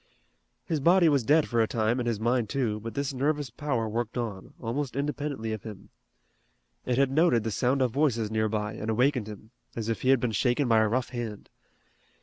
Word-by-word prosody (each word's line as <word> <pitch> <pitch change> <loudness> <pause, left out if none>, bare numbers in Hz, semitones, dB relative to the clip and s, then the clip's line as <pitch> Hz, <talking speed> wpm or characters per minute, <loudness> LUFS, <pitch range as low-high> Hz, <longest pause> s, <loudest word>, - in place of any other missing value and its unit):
His 160 -4 -1
body 175 +4 +5
was 140 -4 +2
dead 150 +6 +3
for 120 -1 +1
a 110 - +2
time 115 +2 0
and 120 - -2
his 115 -3 -1
mind 120 -1 +1
too, 120 -6 -1
but 115 +2 -7
this 140 -1 -2
nervous 145 0 -1
power 125 -4 -2
worked 115 +2 -3
on, 110 -6 -5
almost 125 +3 -3
independently 140 -5 -3
of 110 - -5
him. 105 -3 -10 1.0
It 125 -1 +1
had 135 -1 +3
noted 145 -6 +3
the 110 - -2
sound 130 +6 +1
of 125 - 0
voices 120 -6 +1
nearby, 110 -1 -1
and 110 0 -5
awakened 125 0 +1
him, 110 +1 -10 0.2
as 115 -1 -3
if 115 - -2
he 130 - +1
had 135 -2 +5
been 120 -1 -1
shaken 125 +5 +1
by 115 -2 +4
a 110 - +3
rough 125 +4 -1
hand. 120 -4 -6
120 Hz, 205 wpm, -27 LUFS, 110-140 Hz, 1.0 s, body